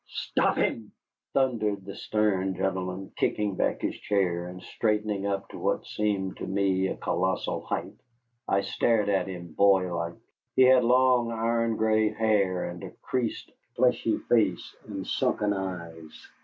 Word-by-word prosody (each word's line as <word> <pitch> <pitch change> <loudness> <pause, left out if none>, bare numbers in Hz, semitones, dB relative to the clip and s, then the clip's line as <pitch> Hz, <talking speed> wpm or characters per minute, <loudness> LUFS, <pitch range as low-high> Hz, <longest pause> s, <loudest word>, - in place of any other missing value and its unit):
"Stop - - 0
him!" 110 -2 -1 0.4
thundered 110 -7 0
the 100 - -7
stern 95 -4 0
gentleman, 95 0 -3
kicking 105 -2 0
back - - 0
his - - 0
chair 90 -4 0
and 90 +1 -8
straightening 105 -2 -1
up 100 -1 -2
to - - -9
what - - 0
seemed 100 -3 -2
to - - -5
me 95 -1 +1
a - - -3
colossal 95 +2 -1
height. - - -3 0.5
I 100 - +2
stared 105 +1 +1
at 95 -2 +1
him, 85 -3 -7
boylike. 90 -3 +2 0.4
He 130 - +6
had 130 -1 +6
long, 125 -1 +4
iron 115 0 0
gray 110 0 +2
hair 105 -5 +1
and 85 -1 -8
a - - -6
creased, 125 -3 -2 0.2
fleshy 125 -2 +2
face 105 -7 +1
and 100 -3 -5
sunken 105 -1 0
eyes. 85 -5 -7
100 Hz, 145 wpm, -27 LUFS, 95-110 Hz, 0.5 s, He